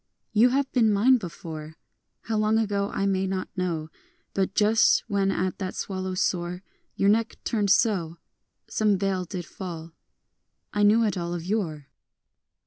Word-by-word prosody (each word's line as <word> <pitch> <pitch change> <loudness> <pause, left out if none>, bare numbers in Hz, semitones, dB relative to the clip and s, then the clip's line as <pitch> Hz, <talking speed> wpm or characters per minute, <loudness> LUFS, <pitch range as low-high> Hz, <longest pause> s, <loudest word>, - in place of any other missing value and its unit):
You 225 +4 +5
have 270 +1 0
been 225 -4 +3
mine 235 +6 +5
before, 160 -5 -8 0.2
— - - -53
How 220 - -2
long 215 +1 +2
ago 200 -2 0
I 195 - -1
may 190 -1 +1
not 190 -1 -3
know: 170 -4 -2 0.4
But 195 0 -1
just 215 +1 +4
when 200 -3 +1
at 185 -1 -1
that 185 -2 -4
swallow's 185 -1 -2
soar 180 +1 -2 0.3
Your 195 - +1
neck 225 +2 +2
turned 210 -3 0
so, 185 -5 +2 0.5
Some 210 -2 +2
veil 190 -1 -1
did 180 -1 -6
fall, 165 -2 -7 0.4
— - - -52
I 205 - 0
knew 215 +3 +5
it 205 -4 0
all 170 0 -3
of 170 -1 -5
yore. 175 -8 -2
195 Hz, 165 wpm, -26 LUFS, 180-215 Hz, 0.5 s, You